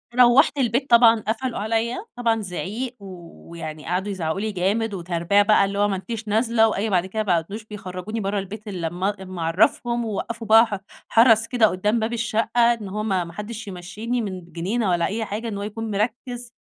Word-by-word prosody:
روّحت 250 +4 +5
البيت 255 +2 0
طبعًا، 230 -1 +7
قفلوا 230 +2 -2
عليا، 230 - -1
طبعًا 230 -2 +1
زعيق 215 +6 -4
ويعني 170 -4 -9
قعدوا 185 +4 -1
يزعقوا 175 -2 -2
لي 215 +1 -2
جامد، 205 +4 0
وتربية 175 +2 +1
بقى، 205 -1 +4
اللي 200 +1 -3
هو 205 - +4
ما 195 - -1
أنتِش 220 +3 -6
نازلة، 225 +1 +3
وأي 215 +1 -1
بعد 185 -3 +2
كده 215 +3 -2
ما 175 -5 +2
بقوش 210 +6 -8
بيخرجوني 200 +1 -6
برّا 200 0 -1
البيت 210 +3 -8
إلا 180 -5 -3
لمّا 180 +4 -1
إلا 195 -2 -6
ما 185 -2 -7
أعرفهم، 235 - +1
ووقفوا 225 +1 -4
بقى 225 +2 +7
ح 205 -3 -4 0.3
حرس 225 -1 +5
كده 240 -3 +4
قدام 210 +5 0
باب 220 +2 -2
الشقة، 235 +1 +2
إن 215 -4 -7
هو 210 +2 -3
ما 190 -4 0
ما 170 - -10
حدش 215 +3 -7
يمشيني 205 +7 -4
من 185 -4 -6
جنينة 195 +5 -1
والا 175 -1 +2
أي 220 +2 -2
حاجة، 215 +3 -4
إن 205 -3 -4
هو 200 - -4
يكون 220 +1 -5
مركّز. 240 +3 -3
210 Hz, 200 wpm, -23 LUFS, 190-230 Hz, 0.3 s, طبعًا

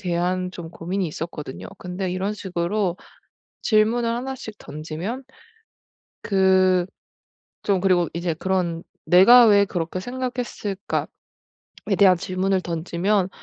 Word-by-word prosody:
대한 180 +1 -1
좀 170 -3 -8
고민이 180 +2 -3
있었거든요. 150 - -7
근데 180 +1 -4
이런 195 +3 -2
식으로 185 -1 -2 0.7
질문을 230 +2 +2
1 250 +3 -3
씩 220 -4 -9
던지면 160 - -6 1.0
그 185 -2 +3 0.8
좀 195 -3 +1
그리고 180 -3 +3
이제 170 -1 -1
그런 175 -1 -1 0.2
'내가 235 +7 +8
왜 205 -2 +6
그렇게 180 -2 -3
생각했을까?'에 245 -4 -4 0.7
대한 190 -2 +6
질문을 185 +1 0
던지면 180 +4 0
185 Hz, 240 characters per minute, -23 LUFS, 175-205 Hz, 1.0 s, 내가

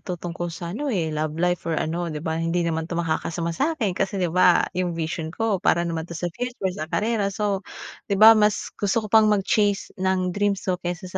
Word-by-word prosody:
to 180 -2 -5
tungkol 175 0 -5
sa 170 +1 -6
ano, 290 +7 -3
eh, 165 -9 -1
love 155 0 -2
life 175 0 +1
or 165 - 0
ano, 170 +3 -2
di 155 -1 -6
ba, 160 0 -1
hindi 170 +1 0
naman 160 0 -2
to 170 - -4
makakasama 170 0 -2
sa'kin 250 - 0
kasi, 195 +2 -2
di 180 -4 -1
ba, 180 0 +5
yung 180 -2 -2
vision 160 0 -3
ko 205 +2 -1
para 170 - +2
naman 165 -1 -3
to 170 - -6
sa 175 +2 -3
future 240 -4 -3
sa 155 -3 -6
karera. 215 0 0
So, 200 -1 -1 0.5
di 200 - +1
ba, 220 +3 +10
mas 210 -1 +1
gusto 210 +2 -1
ko 210 - -9
pang 220 -1 +6
mag-chase 205 0 +1
ng 185 -1 +1
dreams 205 0 0
ko 180 -2 -1
kaysa 175 +2 -4
180 Hz, 220 wpm, -24 LUFS, 165-205 Hz, 0.5 s, ba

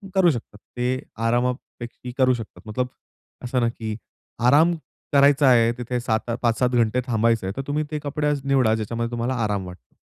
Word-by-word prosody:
करू 185 -2 +5
शकता, 115 -5 -6 0.2
ते 125 +1 0 0.3
आरामापेकी 120 0 -3
करू 130 -1 +4
शकतात. 115 -3 -7
मतलब 125 +4 -1 0.6
असं 125 +1 0
ना 120 - +3
की 110 -2 -5 0.5
आराम 155 +7 +5 0.4
करायचा 140 0 +5
आहे, 115 -2 +5
तिथे 125 0 -2
सात 115 -1 -1
5-7 120 +1 +2
घंटे 120 0 +2
थांबायचं 115 -2 +2
आहे. 95 - -3
तर - - -1
तुम्ही 150 +2 0
ते 150 - -2
कपडे 150 +1 -1
आज 145 -2 -1
निवडा 130 -5 +3
ज्याच्यामध्ये 115 +2 -3
तुम्हाला 120 +2 -1
आराम 100 -3 -1
वाटतो. 90 -9 -14
125 Hz, 170 wpm, -23 LUFS, 115-135 Hz, 0.6 s, करू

